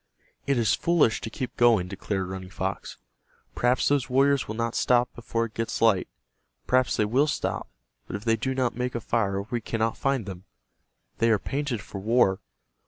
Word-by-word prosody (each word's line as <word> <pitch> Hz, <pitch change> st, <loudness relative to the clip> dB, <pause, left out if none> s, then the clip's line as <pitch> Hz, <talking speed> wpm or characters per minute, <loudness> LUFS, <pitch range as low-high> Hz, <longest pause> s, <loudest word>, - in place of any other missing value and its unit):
"It 140 Hz, -2 st, +2 dB
is 110 Hz, -3 st, +3 dB
foolish 170 Hz, -10 st, +2 dB
to 115 Hz, -, -5 dB
keep 125 Hz, +3 st, -5 dB
going," 115 Hz, -7 st, +4 dB
declared 95 Hz, 0 st, -3 dB
Running 95 Hz, 0 st, -7 dB
Fox. 95 Hz, 0 st, -4 dB, 0.6 s
"Perhaps 125 Hz, +1 st, +2 dB
those 140 Hz, -3 st, +1 dB
warriors 135 Hz, +1 st, +3 dB
will 110 Hz, -, -4 dB
not 115 Hz, 0 st, -1 dB
stop 125 Hz, 0 st, +2 dB
before 115 Hz, 0 st, -2 dB
it 110 Hz, -, -10 dB
gets 115 Hz, +1 st, -3 dB
light. 110 Hz, -5 st, +3 dB, 0.6 s
Perhaps 130 Hz, 0 st, +2 dB
they 105 Hz, -, +2 dB
will 130 Hz, +8 st, +2 dB
stop, 150 Hz, -, -2 dB, 0.4 s
but -, -, -5 dB
if 100 Hz, +3 st, -6 dB
they 115 Hz, -1 st, +3 dB
do 130 Hz, +4 st, -2 dB
not 125 Hz, -2 st, 0 dB
make 125 Hz, 0 st, -3 dB
a -, -, 0 dB
fire 100 Hz, -3 st, 0 dB
we 120 Hz, +2 st, -3 dB
cannot 115 Hz, 0 st, -1 dB
find 135 Hz, -5 st, 0 dB
them. 95 Hz, -1 st, -8 dB, 0.7 s
They 115 Hz, -, +3 dB
are 110 Hz, -, +4 dB
painted 135 Hz, 0 st, -3 dB
for 100 Hz, -, -8 dB
war. 100 Hz, -2 st, +3 dB
115 Hz, 185 wpm, -26 LUFS, 105-125 Hz, 0.7 s, going